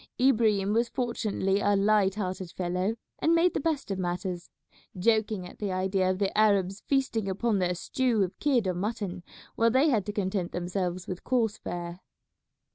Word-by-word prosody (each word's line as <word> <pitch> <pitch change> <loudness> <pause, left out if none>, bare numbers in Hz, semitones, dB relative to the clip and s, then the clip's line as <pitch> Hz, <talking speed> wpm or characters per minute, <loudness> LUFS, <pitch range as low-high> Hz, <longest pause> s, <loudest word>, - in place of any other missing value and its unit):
Ibrahim 215 -6 +3
was 235 +1 +2
fortunately 215 -6 -1
a 205 0 +2
light 200 -1 +3
hearted 185 -3 -3
fellow 185 +4 -1 0.2
and 330 +1 +3
made 345 +2 +3
the - - 0
best 295 -7 -1
of 190 - -2
matters, 175 0 -3 0.5
joking 215 -1 +1
at 180 - -12
the 205 -2 -2
idea 185 0 +1
of 185 - 0
the 195 0 -1
Arabs 200 -2 +2
feasting 260 -7 0
upon 205 +2 0
their 180 -1 +1
stew 235 +3 +1
of 180 - -5
kid 265 -7 +2
or 185 - +1
mutton 195 -1 -3 0.3
while 230 0 +4
they 265 +6 +4
had 215 -7 +1
to - - -1
content 190 -3 -2
themselves 180 0 -2
with 185 -1 -6
coarse 230 -4 0
fare. 175 0 -5
200 Hz, 175 wpm, -28 LUFS, 185-230 Hz, 0.5 s, while